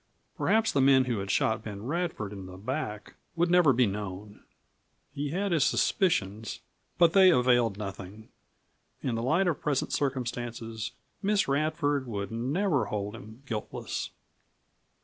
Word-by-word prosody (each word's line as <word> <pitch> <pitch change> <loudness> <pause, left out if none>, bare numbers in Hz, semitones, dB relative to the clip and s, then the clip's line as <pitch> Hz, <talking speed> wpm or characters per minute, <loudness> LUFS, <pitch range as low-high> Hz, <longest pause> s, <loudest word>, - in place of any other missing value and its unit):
Perhaps 225 0 +2
the 140 - +2
men 130 -1 +5
who 120 -4 -1
had 95 0 -5
shot 110 +3 +1
Ben 100 -2 -7
Radford 155 - -2
in 95 -2 -8
the 95 0 -10
back 105 -1 -4 0.2
would 170 +1 +1
never 175 -5 +6
be 125 0 +4
known. 100 0 -5 0.7
He 145 +1 -3
had 195 +5 -1
his 160 -5 +3
suspicions, 110 - 0 0.4
but 170 -1 +5
they 190 -1 +7
availed 125 - +3
nothing. 100 +1 -8 0.7
In 130 - -1
the 115 - -1
light 160 +10 +2
of 170 - -1
present 145 -3 -1
circumstances 120 -5 -3 0.3
Miss 205 0 +2
Radford 145 -1 0
would 100 -3 -4
never 140 - 0
hold 105 0 -3
him 110 +3 -12
guiltless. 110 -5 -4
125 Hz, 145 wpm, -29 LUFS, 105-155 Hz, 0.7 s, they